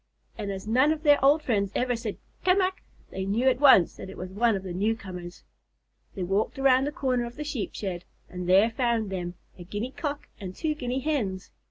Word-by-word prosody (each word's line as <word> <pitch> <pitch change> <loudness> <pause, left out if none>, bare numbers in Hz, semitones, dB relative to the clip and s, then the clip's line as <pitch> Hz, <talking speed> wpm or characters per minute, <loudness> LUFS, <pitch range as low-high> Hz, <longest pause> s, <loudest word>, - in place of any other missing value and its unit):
and 210 -3 -5
as 190 0 -6
none 260 +7 +4
of 315 0 -2
their 290 -3 +5
old 295 +3 +5
friends 200 -7 0
ever 245 0 +1
said 225 -3 -5 0.3
"Ca 365 +1 +4
mac!" 375 -1 0 0.3
they 190 - -4
knew 215 +7 +1
at 255 -1 +3
once 265 - +6
that - - -8
it - - -10
was 185 0 -6
one 225 +2 +2
of 190 - -4
the 185 -2 -5
newcomers. 185 -3 -3 0.7
They 190 - -3
walked 195 +9 0
around 270 -1 +4
the 290 - -2
corner 255 -4 0
of 235 0 -8
the 300 - -5
Sheep 280 -7 -4
shed, 185 -4 -4 0.2
and 180 0 -6
there 200 +5 +5
found 230 -4 0
them, 175 -2 -4 0.2
a - - -7
Guinea 205 +8 -4
Cock 290 0 -4
and 185 -3 -7
two 315 -2 -1
Guinea 255 -2 -3
Hens. 230 -11 -2
230 Hz, 215 wpm, -27 LUFS, 190-270 Hz, 0.7 s, once